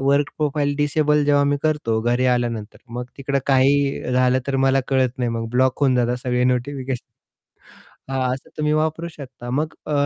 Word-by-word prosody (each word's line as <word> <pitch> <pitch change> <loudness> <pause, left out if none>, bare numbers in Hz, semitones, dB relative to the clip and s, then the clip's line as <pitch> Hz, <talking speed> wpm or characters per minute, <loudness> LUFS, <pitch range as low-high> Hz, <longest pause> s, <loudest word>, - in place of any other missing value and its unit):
Work 140 +1 +2
profile 145 -1 0
disable 150 0 +2
जेव्हा 145 0 +3
मी 145 0 +2
करतो 150 -8 0
घरी 120 +2 +1
आल्यानंतर 115 -3 -2 0.2
मग 125 - -3
तिकडे 140 0 -1
काहीही 135 -1 +2
झालं 125 0 +3
तर 135 - +1
मला 135 0 +3
कळत 130 -1 +1
नाही 125 -1 0
मग 115 0 -3
ब्लॉक 130 +2 +1
होऊन 135 -3 +3
जातात 120 0 +1
सगळे 125 -1 +1
नोटिफिकेशन. 130 0 -1 1.1
हां, 135 -1 -1
असं 130 - -12
तुम्ही 150 0 0
वापरू 160 +2 0
शकता. 130 -4 -9
मग 150 +5 -1
अ 150 - -3
135 Hz, 175 wpm, -21 LUFS, 125-145 Hz, 1.1 s, जेव्हा